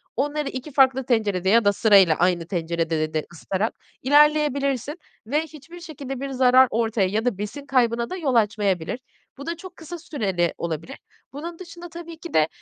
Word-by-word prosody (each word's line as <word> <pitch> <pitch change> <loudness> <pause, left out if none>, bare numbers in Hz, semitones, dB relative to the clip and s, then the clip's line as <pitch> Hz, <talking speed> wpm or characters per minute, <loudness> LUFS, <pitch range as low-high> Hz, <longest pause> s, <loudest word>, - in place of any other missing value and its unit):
onları 290 +3 -1
2 260 +4 -7
farklı 265 -1 +4
tencerede 205 -7 +1
ya 230 +1 +4
da 205 - +4
sırayla 195 -6 +5
aynı 175 -1 +1
tencerede 165 -3 -2
de 155 -1 -1
ısıtarak 190 +6 -2 0.3
ilerleyebilirsin 290 0 +2 0.3
ve 295 +6 +1
hiçbir 320 +2 -11
şekilde 280 -6 -7
bir 275 +1 -4
zarar 260 0 +5
ortaya 225 -3 +1
ya 220 +4 -1
da 240 -6 0
besin 220 +8 -6
kaybına 235 -3 +1
da 370 - -4
yol 280 -8 -1
açmayabilir. 205 -2 +1 0.4
Bu 280 - -8
da 335 +1 -3
çok 365 +1 -11
kısa 340 +1 -8
süreli 195 - -1
olabilir. 165 -1 -5 0.4
Bunun 330 +4 -7
dışında 345 -1 -10
tabii 335 0 -9
ki 340 +1 -10
de, 155 -1 +4
255 Hz, 170 wpm, -23 LUFS, 195-300 Hz, 0.4 s, sırayla